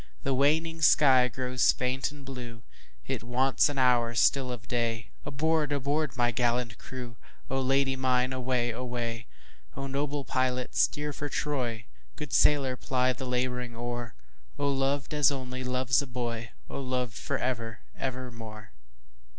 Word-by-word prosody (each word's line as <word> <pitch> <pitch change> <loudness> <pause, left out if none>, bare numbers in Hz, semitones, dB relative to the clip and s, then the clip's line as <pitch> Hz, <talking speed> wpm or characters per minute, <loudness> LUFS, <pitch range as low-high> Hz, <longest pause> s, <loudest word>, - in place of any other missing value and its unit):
The 135 - +1
waning 160 +5 +2
sky 135 -5 +6
grows 125 0 +2
faint 130 +1 -1
and 145 -2 -12
blue, 120 -4 -8 0.4
It - - -2
wants 130 +5 +2
an 145 - -4
hour 120 -2 +3
still 130 +2 +3
of 115 -2 -7
day, 115 -3 -1
Aboard! 155 +1 +1
aboard! 145 0 0
my 120 -1 +3
gallant 120 -1 0
crew,O 130 +1 -6
Lady 135 +1 +2
mine 130 0 +1
away! 125 -1 0
away!O 115 - -6
noble 140 +1 -2
pilot 125 -1 0
steer 150 0 +1
for 145 +1 -4
Troy, 125 -8 -2 0.3
Good 150 - -6
sailor 135 -3 +4
ply 130 0 +1
the 130 0 -6
labouring 125 -1 -1
oar,O 115 - -5
loved 140 +1 0
as 150 -1 +5
only 130 -1 -4
loves 125 0 +2
a 140 - -6
boy!O 120 0 -5
loved 125 -2 -2
for - - -2
ever 115 -3 -3
evermore! 115 - -6
125 Hz, 135 wpm, -29 LUFS, 120-135 Hz, 0.4 s, sky